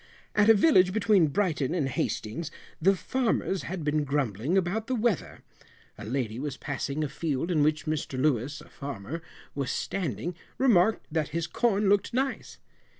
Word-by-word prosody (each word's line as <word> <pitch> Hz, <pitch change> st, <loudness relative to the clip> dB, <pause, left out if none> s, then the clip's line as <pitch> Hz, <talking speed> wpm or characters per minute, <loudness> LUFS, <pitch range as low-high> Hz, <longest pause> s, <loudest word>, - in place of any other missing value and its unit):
At 210 Hz, +1 st, +4 dB
a 225 Hz, -, +9 dB
village 190 Hz, -, +5 dB
between 205 Hz, -5 st, +4 dB
Brighton 160 Hz, -3 st, 0 dB
and 150 Hz, -6 st, +1 dB
Hastings, 135 Hz, +3 st, -2 dB, 0.3 s
the 195 Hz, +4 st, +5 dB
farmers 225 Hz, -4 st, 0 dB
had 175 Hz, -2 st, -5 dB
been 150 Hz, 0 st, +1 dB
grumbling 140 Hz, -, 0 dB
about 195 Hz, +5 st, 0 dB
the 260 Hz, -, 0 dB
weather. 230 Hz, -5 st, -1 dB, 0.5 s
A -, -, -10 dB
lady 120 Hz, -1 st, -2 dB
was 140 Hz, -1 st, -4 dB
passing 145 Hz, +1 st, -3 dB
a -, -, 0 dB
field 150 Hz, +2 st, -2 dB
in 155 Hz, -4 st, +2 dB
which 155 Hz, +2 st, +2 dB
Mr 155 Hz, -4 st, -2 dB
Louis, 140 Hz, 0 st, 0 dB
a -, -, -15 dB
farmer, 140 Hz, +2 st, -6 dB, 0.3 s
was 140 Hz, -3 st, -2 dB
standing, 180 Hz, +1 st, -2 dB, 0.2 s
remarked 220 Hz, -5 st, +3 dB
that 155 Hz, -2 st, 0 dB
his 170 Hz, -, -1 dB
corn 210 Hz, +1 st, +1 dB
looked 205 Hz, +3 st, +2 dB
nice. 265 Hz, +1 st, -2 dB
165 Hz, 160 wpm, -28 LUFS, 140-195 Hz, 0.5 s, a